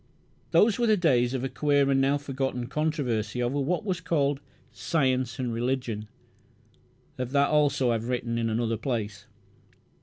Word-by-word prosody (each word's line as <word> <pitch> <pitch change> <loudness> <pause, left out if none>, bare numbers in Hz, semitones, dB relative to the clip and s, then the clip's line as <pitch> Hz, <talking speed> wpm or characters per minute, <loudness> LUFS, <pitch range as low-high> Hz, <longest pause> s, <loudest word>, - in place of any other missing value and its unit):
Those 215 0 +4
were 240 - +2
the 215 -1 +4
days 130 -7 +2
of 130 - -2
a - - 0
queer, 145 0 +2
and 135 0 +3
now 140 +2 +3
forgotten, 135 -3 -3
controversy 130 -6 -1
over 130 +4 -1
what 180 +10 -1
was 180 -4 -2
called 145 -4 0 0.3
"Science 130 -1 0
and 125 -3 -2
Religion". 120 -3 -2 1.1
Of 125 +1 -3
that 140 0 +3
also 145 -4 +2
I - - +2
have 115 +1 -3
written 120 -2 -1
in 115 -1 0
another 115 0 0
place. 105 -4 -4
130 Hz, 160 wpm, -27 LUFS, 120-145 Hz, 1.1 s, Those